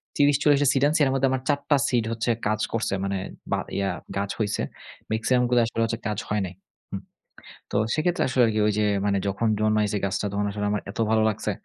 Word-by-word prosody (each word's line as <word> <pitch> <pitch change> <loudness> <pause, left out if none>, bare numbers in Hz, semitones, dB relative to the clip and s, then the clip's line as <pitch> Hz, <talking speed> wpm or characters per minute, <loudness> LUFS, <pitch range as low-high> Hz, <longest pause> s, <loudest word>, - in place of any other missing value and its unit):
৩০-৪০ 145 0 +4
টা - - +3
সিড 135 - +1
আনছি। 155 +2 +1
এর 135 - +1
মধ্যে 135 0 +2
আমার 130 -1 0
৪ 145 -1 +3
টা 145 - +5
সিড 120 -3 +2
হচ্ছে 115 +1 -2 0.2
কাজ 110 0 0
করছে। 115 -3 -1
মানে 100 0 -1 0.3
বা - - +2 0.2
ইয়া 100 -1 0 0.3
গাছ 100 0 -1
হইছে। 105 -1 0 0.5
মেক্সিমাম 120 +3 +2
গুলা 120 -1 +4
আসলে 115 0 -2
হচ্ছে 115 0 -3
কাজ 105 -1 -2
হয় 105 0 +1
নাই। 90 - -7 0.4
হু। - - -3 0.8
তো - - +1 0.2
সেক্ষেত্রে 175 +3 +1
আসলে 130 0 +2
আরকি 110 -1 0
ঐ - - +4
যে, 105 - +3 0.2
মানে 100 -1 +2
যখন 100 +4 0
জন্মাইছে 105 -1 +2
গাছটা 100 +1 -1
তখন 100 +1 -1
আসলে 105 0 -3
আমার 105 - -1
এত - - -11
ভালো 110 0 +3
লাগছে। 105 - -2
110 Hz, 215 wpm, -25 LUFS, 105-130 Hz, 0.8 s, টা